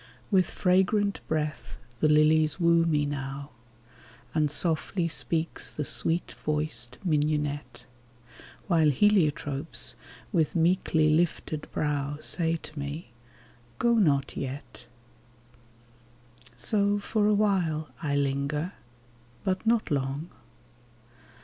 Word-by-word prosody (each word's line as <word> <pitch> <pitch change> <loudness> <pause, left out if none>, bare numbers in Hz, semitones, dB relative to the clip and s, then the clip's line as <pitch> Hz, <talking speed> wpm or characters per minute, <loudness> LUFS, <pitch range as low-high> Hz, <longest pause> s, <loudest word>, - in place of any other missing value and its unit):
With 185 -2 +3
fragrant 200 +2 +2
breath 150 -6 -3 0.2
the 155 - +3
lilies 155 +1 +4
woo 170 -1 +4
me 150 -2 +2
now. 140 0 -5 0.8
And 155 -2 +2
softly 165 +3 0
speaks 165 0 -2
the 150 - -4
sweet 165 +4 -1
voiced 140 -6 -2
mignonette, 150 -5 -1 0.8
While 165 -5 +4
heliotropes, 150 -4 +1 0.4
with 165 -6 +1
meekly 165 -2 +3
lifted 155 -1 0
brow, 145 -1 -1
Say 165 +1 +1
to 155 -1 -8
me, 145 -1 -6 0.4
" 120 0 -29
Go 235 0 +3
not 145 -11 +2
yet." 135 +1 -6 1.7
So 200 - +1
for 210 +1 0
awhile 190 -7 +1
I 145 -3 -1
linger, 140 +5 -1 0.7
but 190 +3 -1
not 230 -6 +2
long. 140 +3 -2
155 Hz, 100 wpm, -28 LUFS, 145-175 Hz, 1.7 s, lilies